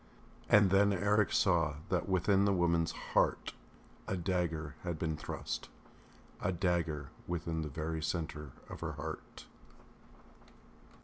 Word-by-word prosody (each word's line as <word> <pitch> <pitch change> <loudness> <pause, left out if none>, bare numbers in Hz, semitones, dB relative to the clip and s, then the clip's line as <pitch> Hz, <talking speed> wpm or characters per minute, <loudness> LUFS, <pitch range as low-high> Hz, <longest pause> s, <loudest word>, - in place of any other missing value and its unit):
And 105 -3 +6
then 100 +1 +5
Eric 105 +2 +2
saw 85 -6 +3
that 90 +1 0
within 95 +2 +3
the 100 - +3
woman's 85 -2 +2 0.2
heart - - +2 0.5
a 95 - -1
dagger 85 -4 -1
had 85 -3 -3
been 80 0 -1
thrust.... - - -5 0.7
A 90 - +1
dagger 85 -6 0 0.2
within 85 -2 -2
the 75 - -3
very 80 +2 -3
centre 75 -2 -3 0.2
of - - -8
her - - -3
heart. - - -7
85 Hz, 125 wpm, -34 LUFS, 80-95 Hz, 0.7 s, And